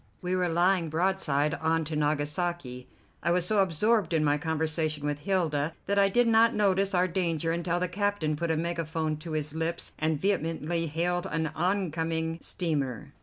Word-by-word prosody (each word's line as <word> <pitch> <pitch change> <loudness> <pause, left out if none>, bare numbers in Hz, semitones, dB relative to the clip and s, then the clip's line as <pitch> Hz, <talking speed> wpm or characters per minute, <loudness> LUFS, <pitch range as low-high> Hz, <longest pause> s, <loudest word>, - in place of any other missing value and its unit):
We 180 +1 -2
were 180 -1 +1
lying 175 0 +2
broadside 160 -3 +1
on 160 0 +1
to 155 +1 -4
Nagasaki. 150 -3 -1 0.3
I - - 0
was 175 0 +2
so 210 +2 +2
absorbed 190 +1 +2
in 155 - +2
my 145 -1 +3
conversation 155 -1 -1
with 145 0 -1
Hilda 160 -3 0
that 200 +1 +1
I 195 0 +5
did 240 +4 +3
not 230 +1 +5
notice 195 -1 +2
our 180 +1 +3
danger 165 -3 -1
until 170 +1 -1
the 180 - 0
captain 200 -4 -1
put 170 +3 -2
a 160 - +1
megaphone 160 -2 -2
to 160 +1 -7
his 150 -1 -2
lips 165 +1 -3
and 155 -1 0
vehemently 165 -2 -1
hailed 175 +4 -1
an 160 -2 -2
oncoming 165 -3 -1
steamer. 145 - -2
165 Hz, 170 wpm, -28 LUFS, 155-180 Hz, 0.3 s, I